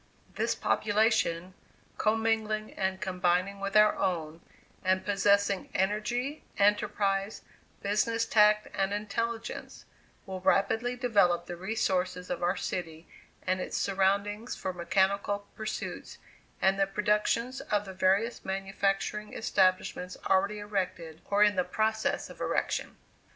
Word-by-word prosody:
This - - 0
population, 205 -5 +1 0.5
commingling 220 -1 0
and 190 0 -2
combining 185 0 0
with 195 +1 0
our 210 0 +6
own, 165 -3 -2 0.4
and 185 0 +1
possessing 200 -1 +2
energy, 240 +9 -1
enterprise, 200 0 +1 0.4
business 225 +3 +1
tact 210 -1 +4
and 195 +1 0
intelligence, 225 +2 -4 0.4
will 190 -1 -6
rapidly 200 +6 +2
develop 200 -8 +2
the 175 - -6
resources 185 -2 -1
of 180 - -3
our 175 +2 +1
city 165 -2 -4 0.4
and 185 0 0
its - - -3
surroundings 200 +3 0
for 185 - -4
mechanical 200 +3 0
pursuits, 215 0 -5 0.5
and 195 +1 +3
the 195 - +3
productions 210 +5 0
of 210 0 -1
the 190 - -8
various 195 +5 +1
manufacturing 195 +2 -2
establishments 185 -3 +1
already 200 +2 +2
erected, 185 -6 -4
or 205 +1 +3
in 205 -3 +3
process 220 0 0
of - - -12
erection. - - -1
200 Hz, 115 wpm, -29 LUFS, 185-210 Hz, 0.5 s, our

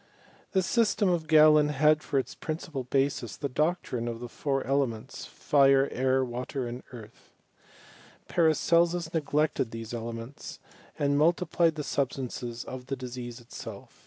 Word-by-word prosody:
The 190 -1 +3
system 215 -1 +2
of 170 -3 0
Galen 155 -1 +6
had 150 +1 +3
for 140 - -2
its 135 - -1
principal 155 -4 -5
basis 135 -3 -1
the 140 - -2
doctrine 145 -4 -1
of 115 -1 -4
the 120 - -6
four 135 +2 -2
elements, 135 -5 -2
JirCy 135 -1 +3
air, 130 +1 +1
watery 125 +1 -4
and 120 +2 -6
earth, 115 -3 -13 1.0
Paracelsus 170 +1 +2
neglected 150 -5 0
these 115 0 -7
elements, 115 +2 -6 0.4
and 145 0 +1
multiplied 165 0 +2
the 150 - -4
substances 125 -4 -3
of 130 -1 -8
the 135 - -2
disease 125 -2 -7
itself. 120 - -10
140 Hz, 135 wpm, -28 LUFS, 125-155 Hz, 1.0 s, Galen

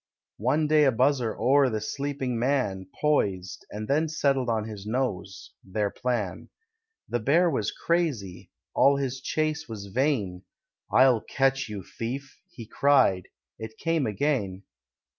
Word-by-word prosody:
One 155 +1 +2
day 150 0 +4
a 135 - +5
buzzer 125 -1 +1
o'er 135 +1 +4
the 110 -2 -2
sleeping 135 +1 -3
man 115 -8 0
Poised, 95 -11 0
and 105 +1 -6
then 155 +3 +1
settled 135 -4 +1
on 110 -2 0
his 105 -3 -8
nose, 105 -6 -3
their 100 +1 -2
plan. 120 -7 -3 0.6
The 120 - -1
Bear 165 +9 +3
was 110 -7 0
crazy: 115 - -2 0.2
all 140 +1 +5
his 135 -2 -3
chase 155 0 -1
was 105 -3 -6
vain; 115 -10 0 0.5
"I'll 130 -4 +5
catch 135 -2 0
you, 100 -3 -6
thief!" 130 +8 -6
he 125 -10 -10
cried: 115 -7 +3 0.3
it 110 0 -8
came 165 -5 0
again. 105 -4 -1
125 Hz, 140 wpm, -27 LUFS, 105-140 Hz, 0.6 s, a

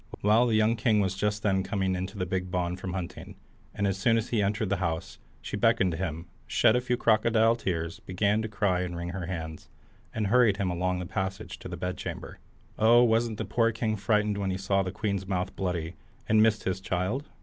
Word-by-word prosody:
Well, 110 +4 +4
the 115 - +2
young 110 +2 +3
king 110 0 +2
was 95 -2 +1
just 105 +2 -1
then 95 -2 +2
coming 95 -1 -1
into 95 +3 -4
the 90 - -1
big 90 0 -2
bawn 90 -1 -1
from 95 -1 -6
hunting, 90 -2 -6 0.4
and 100 - -2
as 95 -1 0
soon 115 +3 +3
as 115 +2 -2
he 115 -3 +1
entered 105 +1 0
the 100 - +1
house, 85 -3 -3 0.2
she - - -4
beckoned 115 -3 +3
to 80 - -4
him, 85 -2 -3 0.2
shed 110 -1 +4
a 125 - +2
few 125 0 -1
crocodile 115 0 +3
tears, 85 -6 -3
began 100 +3 0
to 110 - -3
cry 100 -4 0
and 90 -1 -3
wring 85 0 -4
her 90 -2 -5
hands, 80 -4 -6 0.4
and 110 -1 -2
hurried 110 -1 +4
him 95 -3 -1
along 90 +1 -1
the 90 - -4
passage 95 +2 -4
to - - -8
the - - -6
bedchamber. 90 0 -5 0.4
Oh, 120 +2 +6
wasn't 115 -1 +2
the - - -3
poor 115 -1 +2
king 110 -1 -1
frightened 105 0 +1
when 100 -1 -1
he 95 - -1
saw 95 0 +1
the 95 -1 -3
queen's 100 -2 -2
mouth 95 -1 -2
bloody, 85 -3 -2 0.3
and 110 0 +4
missed 110 0 +3
his 95 0 -1
child? 95 +10 -2
100 Hz, 220 wpm, -28 LUFS, 90-110 Hz, 0.4 s, Oh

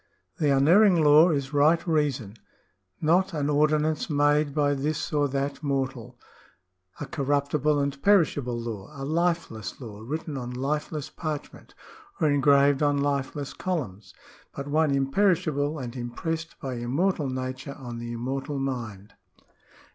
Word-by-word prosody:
— - - -45
" - - -45
The 150 -3 +2
unerring 170 +6 +5
law 150 +4 +7
is 140 -3 -2
right 155 +3 +3
reason; 145 -10 0 0.7
not 175 +3 +2
an 145 -1 0
ordinance 155 +2 +1
made 145 0 +2
by 145 -1 +2
this 150 +3 -2
or 145 -1 +2
that 140 +1 -3
mortal, 135 -4 -3 0.8
a - - -4
corruptible 145 0 0
and 140 -1 -2
perishable 145 -11 +2
law, 110 -4 -6
a 135 - -4
lifeless 165 - -1
law 110 -5 -9
written 150 +4 -4
on 125 -1 -5
lifeless 150 +3 -3
parchment, 155 -3 -6 0.4
or 160 - +3
engraved 140 0 +4
on 145 -1 +2
lifeless 140 0 -2
columns; 105 - -4 0.4
but 140 - -5
one 155 +1 +2
imperishable, 145 +1 +1
and 125 -3 -6
impressed 160 +7 -4
by 130 -2 -4
immortal 140 +5 0
Nature 130 +1 -5
on 120 -4 -7
the 120 0 -6
immortal 135 +4 -3
mind." 115 -7 -5
145 Hz, 140 wpm, -26 LUFS, 130-155 Hz, 0.8 s, law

